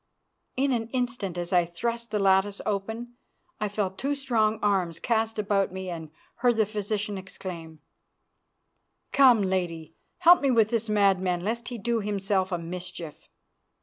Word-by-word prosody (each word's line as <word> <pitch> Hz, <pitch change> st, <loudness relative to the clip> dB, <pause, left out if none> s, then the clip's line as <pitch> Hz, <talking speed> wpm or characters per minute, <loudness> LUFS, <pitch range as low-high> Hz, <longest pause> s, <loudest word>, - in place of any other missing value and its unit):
In 275 Hz, +1 st, +2 dB
an 230 Hz, -3 st, 0 dB
instant, 245 Hz, -7 st, -2 dB
as 175 Hz, +1 st, -3 dB
I 175 Hz, -1 st, +5 dB
thrust 235 Hz, +7 st, -3 dB
the 210 Hz, -, -1 dB
lattice 195 Hz, 0 st, +3 dB
open, 220 Hz, +4 st, -3 dB, 0.5 s
I 210 Hz, -1 st, -1 dB
felt 195 Hz, -2 st, -2 dB
two 280 Hz, +2 st, 0 dB
strong 225 Hz, -6 st, +1 dB
arms 185 Hz, -5 st, +1 dB
cast 225 Hz, 0 st, 0 dB
about 200 Hz, -2 st, +1 dB
me 190 Hz, -1 st, -5 dB
and 160 Hz, -2 st, -6 dB, 0.3 s
heard 240 Hz, 0 st, +3 dB
the 220 Hz, -1 st, +3 dB
physician 210 Hz, -1 st, -3 dB
exclaim, 170 Hz, -4 st, -8 dB, 1.3 s
"Come, 250 Hz, -6 st, +6 dB
Lady, 170 Hz, -4 st, -2 dB, 0.2 s
help 350 Hz, 0 st, +7 dB
me 280 Hz, -, +2 dB
with 225 Hz, -4 st, +4 dB
this 230 Hz, -1 st, -1 dB
madman, 190 Hz, -4 st, +2 dB
lest 235 Hz, +4 st, -2 dB
he 245 Hz, -, -5 dB
do 235 Hz, +1 st, 0 dB
himself 195 Hz, -2 st, -1 dB
a 175 Hz, -, 0 dB
mischief." 175 Hz, -1 st, -8 dB
205 Hz, 150 wpm, -27 LUFS, 185-230 Hz, 1.3 s, help